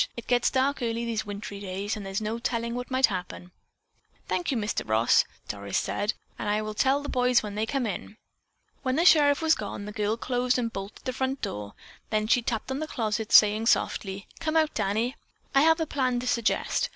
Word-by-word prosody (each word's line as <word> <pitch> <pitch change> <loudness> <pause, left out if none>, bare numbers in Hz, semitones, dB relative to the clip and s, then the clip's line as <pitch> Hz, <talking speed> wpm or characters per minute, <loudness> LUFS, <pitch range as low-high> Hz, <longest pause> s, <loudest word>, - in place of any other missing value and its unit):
It 235 - -6
gets 245 -1 +2
dark 270 +1 +1
early 230 0 -1
these 225 -2 -2
wintry 200 0 -6
days 200 +2 -3
and 210 - -6
there's 195 0 -3
no 220 +2 -3
telling 235 -1 -2
what 245 +1 -5
might 260 0 +4
happen." 180 -2 -5 0.8
"Thank 350 - -1
you, 265 - +1
Mr. 210 -1 -1
Ross." 110 +2 +4 0.2
Doris 100 -1 -3
said, 205 +1 -1 0.2
"I 210 0 0
will 215 0 -4
tell 270 +6 +2
the - - -5
boys 250 -2 +2
when 210 -1 -5
they 215 +2 -1
come 270 -1 -1
in." 210 0 -5 0.6
When 260 0 0
the 335 - +2
sheriff 295 -3 +6
was 320 0 +5
gone, 205 -4 -4
the 210 - -6
girl 210 +1 -1
closed 250 +1 0
and 230 -2 -2
bolted 195 +1 -7
the 255 - -2
front 265 +1 -2
door, 105 0 -5 0.3
then 215 -1 +1
she 240 +3 +3
tapped 230 +2 -3
on 265 - -2
the 310 - -3
closet, 220 -5 -2
saying 215 +1 +6
softly: 195 -3 0
"Come 325 -1 0
out, 315 -1 +2
Danny. 220 +5 -1 0.4
I 275 - +5
have 320 +2 +5
a 320 - +1
plan 255 -4 0
to - - -5
suggest. 235 -3 +1
230 Hz, 210 wpm, -27 LUFS, 205-260 Hz, 0.8 s, sheriff